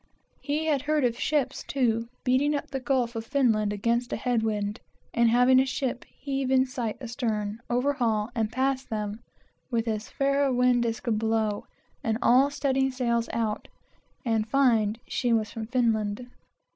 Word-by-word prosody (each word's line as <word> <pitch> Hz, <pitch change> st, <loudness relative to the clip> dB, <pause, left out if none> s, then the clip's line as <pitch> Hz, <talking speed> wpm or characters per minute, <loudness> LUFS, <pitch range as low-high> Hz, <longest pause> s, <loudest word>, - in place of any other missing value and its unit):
He 300 Hz, +2 st, -2 dB
had 295 Hz, -4 st, +1 dB
heard 300 Hz, -1 st, +1 dB
of 240 Hz, 0 st, -1 dB
ships, 285 Hz, -3 st, 0 dB
too, 230 Hz, -4 st, 0 dB, 0.2 s
beating 270 Hz, +4 st, +2 dB
up 285 Hz, 0 st, -4 dB
the 270 Hz, -, -2 dB
gulf 250 Hz, -2 st, 0 dB
of 225 Hz, -, -3 dB
Finland 225 Hz, -5 st, +2 dB
against 235 Hz, +4 st, 0 dB
a -, -, 0 dB
head 240 Hz, 0 st, 0 dB
wind, 210 Hz, 0 st, -2 dB, 0.3 s
and 235 Hz, 0 st, +4 dB
having 250 Hz, +2 st, +5 dB
a 265 Hz, -, +4 dB
ship 255 Hz, -2 st, -2 dB
heave 275 Hz, -2 st, -4 dB
in 260 Hz, 0 st, +4 dB
sight 250 Hz, -4 st, -4 dB
astern, 225 Hz, -4 st, -3 dB
overhaul 240 Hz, -4 st, +1 dB
and 220 Hz, -2 st, -1 dB
pass 260 Hz, +2 st, 0 dB
them, 210 Hz, -2 st, -4 dB, 0.5 s
with 235 Hz, -2 st, -1 dB
as 215 Hz, -1 st, -2 dB
fair 275 Hz, +1 st, +1 dB
a 275 Hz, -, +2 dB
wind 250 Hz, -1 st, +3 dB
as 225 Hz, 0 st, -3 dB
could 220 Hz, -3 st, 0 dB
blow, 220 Hz, -2 st, 0 dB, 0.4 s
and 220 Hz, -1 st, 0 dB
all 260 Hz, +4 st, +5 dB
studding 270 Hz, -2 st, +1 dB
sails 235 Hz, -3 st, -1 dB
out, 220 Hz, -2 st, -2 dB, 0.6 s
and 225 Hz, -2 st, 0 dB
find 230 Hz, -5 st, +3 dB
she 245 Hz, -, 0 dB
was 215 Hz, -2 st, +1 dB
from 220 Hz, -1 st, -6 dB
Finland. 225 Hz, -2 st, 0 dB
240 Hz, 170 wpm, -27 LUFS, 220-265 Hz, 0.6 s, having